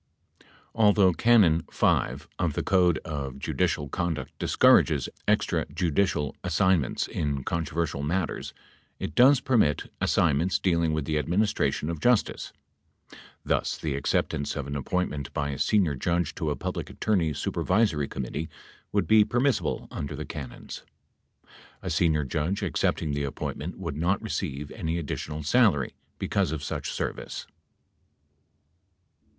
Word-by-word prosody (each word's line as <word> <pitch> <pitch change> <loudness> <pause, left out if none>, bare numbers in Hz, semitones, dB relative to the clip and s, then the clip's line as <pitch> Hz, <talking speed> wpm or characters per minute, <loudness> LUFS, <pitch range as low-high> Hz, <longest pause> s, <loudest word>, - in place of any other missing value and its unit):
8 - - -25 0.3
Although 105 -4 +5
Canon 95 -5 +5
5(g) - - 0
of - - 0
the - - -2
Code 90 -3 +3
of 70 -4 -4
Judicial 75 +1 -1
Conduct 85 +1 -3
discourages - - +4 0.2
extra - - +1
judicial 85 -4 0
assignments 90 -4 +2
in 70 -3 -2
controversial 80 -2 -2
matters, 85 +4 -2 0.5
it 75 - -5
does 130 - +6
permit 115 - +1
as - - +1
signments 85 +7 +2
dealing 85 -3 +1
with 75 -2 -1
"the 75 -1 0
administration 90 -2 0
of 85 -1 -3
justice." 120 +2 +1 0.9
Thus, - - 0
the 75 -3 -3
acceptance 70 +1 -1
of 70 - -3
an 70 +1 -5
appointment 70 -1 -2
by 70 -2 -1
a 70 - -5
senior 95 -8 +2
judge 85 +5 -1
to 80 - -2
a 75 - 0
Public - - -4
Attorney 90 -8 0
Supervisory 80 +1 0
Committee 70 +5 -4 0.4
would - - +1
be 110 -1 +6
permissible 125 +3 0
under 70 0 -4
the 75 +1 -5
canons. 70 -5 -8 1.0
A 90 - -3
senior 80 -2 +2
judge 80 +8 -2
accepting 75 - 0
the 70 0 -1
appointment 70 +4 -5
would 85 -6 -5
not 85 +6 +1
receive 75 -10 -4
any 80 -6 -3
addi 85 -4 -3
tional 75 0 -6
salary 95 - +3 0.2
because - - 0
of 75 -2 -4
such - - -3
service. - - -4
80 Hz, 135 wpm, -27 LUFS, 75-95 Hz, 1.0 s, does